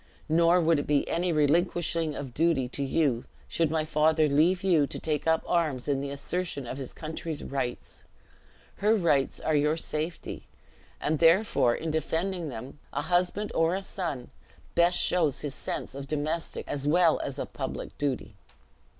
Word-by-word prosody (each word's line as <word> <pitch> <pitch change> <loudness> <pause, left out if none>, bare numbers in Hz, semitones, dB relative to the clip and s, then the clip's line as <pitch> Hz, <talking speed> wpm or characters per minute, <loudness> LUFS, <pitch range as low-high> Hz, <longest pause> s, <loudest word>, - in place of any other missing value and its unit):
Nor 170 +2 +4
would 165 -2 +3
it - - -4
be 145 -1 +2
any 175 +1 0
relinquishing 165 +1 +1
of 135 -4 -6
duty 160 -4 +2
to 140 - -4
you, 135 -4 +1 0.2
should 165 -2 +1
my 155 0 0
father 155 +1 +3
leave 165 +6 +3
you 165 -7 +3
to - - -5
take 155 -1 -2
up 160 0 +3
arms 155 -8 0
in 140 -2 +1
the 140 - -4
assertion 140 +1 -3
of 130 +3 -6
his 130 - -6
country's 160 -1 -5
rights. 135 -3 -4 0.8
Her 215 +2 +3
rights 150 -9 +1
are 155 - -1
your 150 +2 +2
safety; 160 +1 -4 0.5
and 155 0 0
therefore, 165 - +4
in 160 0 -3
defending 165 +2 -1
them, 130 +3 -8
a 145 - -2
husband 180 +4 0
or 165 +2 +2
a 195 - -2
son 165 -11 -4 0.4
best 170 +1 +4
shows 160 -6 +2
his 145 -3 -3
sense - - -5
of 140 0 -7
domestic, 155 +3 -3
as 145 0 -3
well 165 +1 +4
as 140 - -4
of - - -5
public - - -5
duty." 140 -3 -2
155 Hz, 165 wpm, -28 LUFS, 140-170 Hz, 0.8 s, Nor